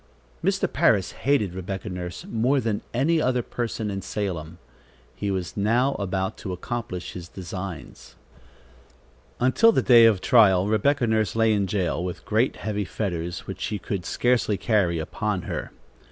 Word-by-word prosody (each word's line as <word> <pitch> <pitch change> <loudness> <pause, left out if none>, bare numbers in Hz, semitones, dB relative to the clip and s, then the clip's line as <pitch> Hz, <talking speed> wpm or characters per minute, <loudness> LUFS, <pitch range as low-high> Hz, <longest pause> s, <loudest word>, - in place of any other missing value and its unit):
Mr. - - +1
Parris - - +3
hated 120 -10 0
Rebecca 95 +1 -5
Nurse 90 -2 -6
more 125 +5 +1
than 110 -4 -1
any 155 +7 +2
other 125 -2 +1
person 115 -3 -3
in 95 0 -4
Salem. 90 -6 -4 0.6
He 100 - -3
was 95 -3 -3
now 120 +7 +2
about 95 -1 -2
to 95 - -5
accomplish 90 -1 -5
his 85 -2 -8
designs. 90 -2 -8 1.2
Until 130 - +5
the - - +1
day 120 -3 +7
of 110 -4 +4
trial, 95 -5 +5
Rebecca 125 +5 +2
Nurse 110 -1 +1
lay 115 -1 +3
in 100 -2 +1
jail, 90 -3 -1
with 90 -1 -5
great, 110 +4 +1
heavy 105 +1 -3
fetters, 85 -4 -3
which - - -7
she 105 - -2
could 95 0 -4
scarcely 120 0 +1
carry, 100 -8 +1
upon 80 - -2
her. - - -4
105 Hz, 155 wpm, -25 LUFS, 90-115 Hz, 1.2 s, day